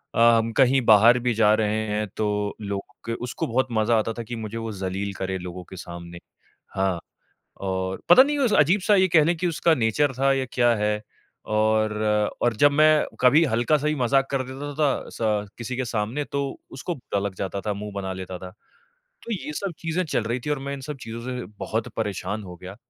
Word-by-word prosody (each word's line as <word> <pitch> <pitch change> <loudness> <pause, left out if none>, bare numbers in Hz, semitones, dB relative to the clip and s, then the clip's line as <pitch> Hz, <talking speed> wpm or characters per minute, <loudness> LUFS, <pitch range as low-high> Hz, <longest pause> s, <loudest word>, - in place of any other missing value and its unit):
अ, - - 0 0.2
हम 115 0 0
कहीं 135 0 +5
बाहर 110 +3 +7
भी 120 0 0
जा 110 -1 +4
रहे 105 0 +1
हैं, 105 0 -1
तो 105 -1 -1
लोगों 100 -1 -5
के 115 - -2
उसको 125 - -3
बहुत 130 +2 +1
मज़ा 115 +1 +2
आता 115 +1 -2
था 120 +1 -6
कि 120 +2 -6
मुझे 110 0 -6
वो 115 -1 -4
ज़लील 100 0 -3
करे 95 0 -3
लोगों 90 0 -7
के - - -9
सामने। 85 -1 -9 0.6
हाँ, 95 -2 0 0.6
और 95 -1 -3
पता 260 - +9
नहीं 290 +2 -1
उस 255 -6 +2
अजीब-सा 185 +7 +4
ये 190 -1 +4
कह 160 -3 +5
लें 170 +2 +1
कि 175 +2 -1
उसका 165 0 +2
नेचर 135 +3 +1
था 135 0 +3
या 135 - 0
क्या 120 -1 +3
है, 105 0 0 0.4
और 110 0 +2 0.5
और 120 -3 +2
जब 145 +3 +5
मैं 155 +1 +5 0.2
कभी 135 +6 +6
हल्का-सा 140 +5 +1
भी 155 - +2
मज़ाक 135 +1 +2
कर 135 -1 0
देता 145 +2 -6
था 145 -3 +1
स 105 -2 0
किसी 120 +1 -4
के 130 - -1
सामने, 115 +5 -2
तो 140 -1 -4
उसको 170 +6 -4
बुरा 110 -7 -3
लग 100 -1 -3
जाता 95 +1 -4
था, 105 - -1
मुँह 105 +1 -6
बना 95 -1 -3
लेता 95 -1 -6
था। 90 0 -9 0.7
तो 235 - -7
ये 175 -6 -5
सब 195 +3 -2
चीज़े 165 +2 -1
चल 120 -7 -1
रही 120 +3 -2
थीं 150 - 0
और 145 - -1
मैं 140 +1 -4
इन 135 - -9
सब 150 - -5
चीज़ों 115 +1 -6
से 125 -3 -4
बहुत 110 +2 -2
परेशान 105 -1 -3
हो 90 -1 -9
गया। 90 +2 -9
115 Hz, 215 wpm, -24 LUFS, 105-140 Hz, 0.7 s, पता